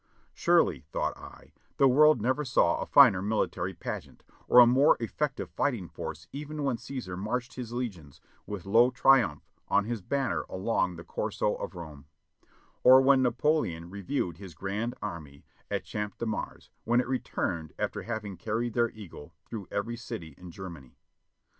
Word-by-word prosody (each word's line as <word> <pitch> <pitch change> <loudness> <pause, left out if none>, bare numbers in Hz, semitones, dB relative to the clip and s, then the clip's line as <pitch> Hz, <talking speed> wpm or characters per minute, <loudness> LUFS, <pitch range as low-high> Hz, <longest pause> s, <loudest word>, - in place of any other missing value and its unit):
"Surely," - - +3
thought - - -1
I, - - -14 0.2
"the 135 - +6
world 150 +1 +6
never 130 +6 +1
saw 130 -2 +2
a - - -4
finer 120 -10 +7
military 105 +2 -1
pageant, - - -7 0.2
or - - +4
a 125 - +11
more 130 +5 +5
effective 135 +4 -3
fighting 120 -11 -1
force 80 +3 -7
even 150 +1 -5
when 135 -4 0
Caesar 115 -6 -6
marched 120 +7 -3
his 125 -3 -7
legions 100 - -5 0.3
with 100 -3 -6
'lo 115 +5 +5
Triumphe' 125 - +3 0.2
on 105 - +2
his 115 -1 -3
banner 135 +6 -1
along 95 -2 0
the 85 - -9
Corso - - -1
of - - -6
Rome; 75 -5 -9 0.8
or 130 +1 +9
w^hen 135 0 +5
Napoleon 120 - 0
reviewed 95 - -3
his 95 -5 -10
grand 105 +8 -3
army 75 -4 -7 0.2
at - - -2
Champ 105 -1 -5
de - - -3
Mars 110 - -5
when 120 +2 +2
it 125 - 0
returned 85 - -2
after - - -2
having 105 -5 -5
carried 110 +5 -2
their 120 0 +2
eagle 100 -9 -12
through 105 -5 -7
every 115 +4 -3
city 110 -10 -7
in 90 +2 -12
Germany." 85 -7 -10
115 Hz, 160 wpm, -29 LUFS, 90-125 Hz, 0.8 s, a